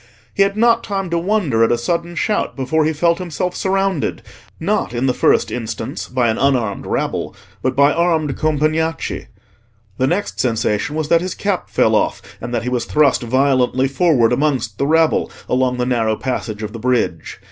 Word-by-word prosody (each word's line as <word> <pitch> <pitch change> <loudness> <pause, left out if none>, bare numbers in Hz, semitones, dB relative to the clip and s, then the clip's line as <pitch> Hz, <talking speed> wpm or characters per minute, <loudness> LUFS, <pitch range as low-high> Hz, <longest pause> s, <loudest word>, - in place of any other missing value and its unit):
He - - 0
had 200 +1 +2
not 230 +1 +3
time 195 -4 -3
to 170 - +1
wonder 170 - +1
at 115 - +3
a 120 - +2
sudden 170 +7 -2
shout 210 +4 -1
before 145 +4 0
he 160 - +2
felt 170 +3 +1
himself 180 0 -3
surrounded, 195 -4 -1 0.4
not, 120 - -1
in 120 +2 0
the 130 - +2
first - - +2
instance, 110 -4 -5
by 125 0 +1
an 110 - -1
unarmed 125 -7 0
rabble, - - -2 0.3
but 130 0 -1
by 140 +2 +4
armed 160 -4 +1
Compagnacci; 155 +1 -1 0.7
the 130 - +2
next 190 +7 -2
sensation 115 +3 0
was 155 -1 -2
that 165 - +4
his 185 0 -4
cap 200 -3 -2
fell - - +2
off, - - +1 0.2
and 120 - -5
that 120 -2 -1
he - - -5
was 125 -1 -1
thrust 145 -4 +3
violently 130 +1 +2
forward 135 -5 +2
amongst 125 -6 -1
the 140 - +1
rabble, 160 +1 +2 0.2
along 125 0 +1
the 125 - 0
narrow 115 -3 +1
passage 110 -4 -4
of 105 0 -5
the 115 - -6
bridge. 115 -8 -1
140 Hz, 185 wpm, -18 LUFS, 120-170 Hz, 0.7 s, by